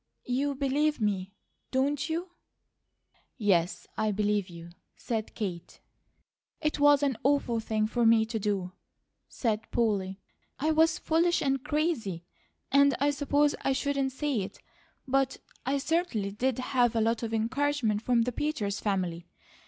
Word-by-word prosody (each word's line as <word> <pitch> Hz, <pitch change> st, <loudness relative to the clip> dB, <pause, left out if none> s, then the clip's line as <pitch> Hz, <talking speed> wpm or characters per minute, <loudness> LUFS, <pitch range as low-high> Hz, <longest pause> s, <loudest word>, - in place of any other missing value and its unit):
You 275 Hz, +3 st, 0 dB
believe 285 Hz, +2 st, +1 dB
me, 200 Hz, -2 st, -1 dB, 0.3 s
don't 275 Hz, +3 st, 0 dB
you?" 345 Hz, +3 st, -3 dB, 1.1 s
"Yes, 180 Hz, -5 st, +1 dB
I 215 Hz, -, 0 dB
believe 205 Hz, -1 st, 0 dB
you," 170 Hz, 0 st, -10 dB, 0.3 s
said 225 Hz, -2 st, -4 dB
Kate. 180 Hz, -6 st, -5 dB, 0.8 s
"It 305 Hz, -2 st, -1 dB
was 290 Hz, 0 st, +5 dB
an 270 Hz, -5 st, +1 dB
awful 270 Hz, -4 st, +1 dB
thing 215 Hz, -1 st, 0 dB
for 235 Hz, +2 st, 0 dB
me 225 Hz, -1 st, +5 dB
to 225 Hz, 0 st, -3 dB
do," 195 Hz, -3 st, -1 dB, 0.6 s
said 220 Hz, -3 st, -2 dB
Polly. 200 Hz, -4 st, 0 dB, 0.4 s
"I 310 Hz, +3 st, +1 dB
was 320 Hz, +2 st, +4 dB
foolish 340 Hz, +1 st, +2 dB
and 270 Hz, -2 st, 0 dB
crazy, 295 Hz, -, -1 dB, 0.5 s
and 280 Hz, 0 st, +5 dB
I 285 Hz, +2 st, +3 dB
suppose 285 Hz, +1 st, +2 dB
I 270 Hz, -, +1 dB
shouldn't 275 Hz, -1 st, 0 dB
say 275 Hz, -2 st, -1 dB
it, 190 Hz, -, -7 dB, 0.5 s
but 270 Hz, 0 st, +1 dB, 0.3 s
I 275 Hz, +1 st, +2 dB
certainly 280 Hz, -, -1 dB
did 250 Hz, +4 st, -1 dB
have 250 Hz, -2 st, +1 dB
a 225 Hz, -, +2 dB
lot 225 Hz, +1 st, +1 dB
of 230 Hz, -1 st, -3 dB
encouragement 230 Hz, -1 st, 0 dB
from 235 Hz, 0 st, +2 dB
the 250 Hz, -, -1 dB
Peters 225 Hz, -7 st, -2 dB
family. 180 Hz, -4 st, -2 dB
245 Hz, 145 wpm, -29 LUFS, 210-285 Hz, 1.1 s, was